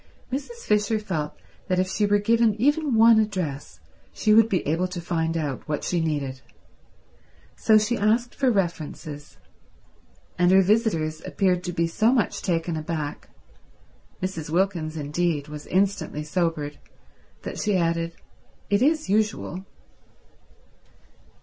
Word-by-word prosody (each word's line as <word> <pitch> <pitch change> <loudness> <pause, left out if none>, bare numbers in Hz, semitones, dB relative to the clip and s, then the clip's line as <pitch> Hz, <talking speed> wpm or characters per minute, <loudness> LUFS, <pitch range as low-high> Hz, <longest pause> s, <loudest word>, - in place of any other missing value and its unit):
Mrs. 470 - -5
Fisher 210 +1 +2
felt 165 -8 -3 0.3
that 185 - +1
if 185 0 +2
she 205 +2 0
were 205 0 +4
given 225 0 +2
even 290 +1 +2
one 225 0 +7
address 185 -10 -3 0.3
she 215 - +2
would 225 +1 +6
be 185 - 0
able 165 +5 +1
to 180 -1 -6
find 165 -1 -1
out 145 -5 -3
what 150 - -2
she 175 -2 0
needed. 140 -5 -2 1.1
So 220 -1 +4
she 215 +3 +1
asked 230 +4 +1
for 270 -2 +1
references, 160 -7 -3 1.0
and 175 0 +4
her 190 +1 +6
visitors 175 -7 +1
appeared 180 -2 0
to 180 - -2
be 170 -1 0
so 215 +8 +2
much 250 -4 0
taken 170 -2 -1
aback—Mrs. 160 +2 -7
Wilkins, 170 -2 0
indeed, 150 0 -1
was 150 0 -8
instantly 190 -5 0
sobered—that 155 -3 -5
she 210 -3 +1
added, 165 -1 0 0.6
"It 200 +2 +3
is 310 +3 +2
usual." 205 -2 -1
185 Hz, 130 wpm, -25 LUFS, 160-215 Hz, 1.1 s, one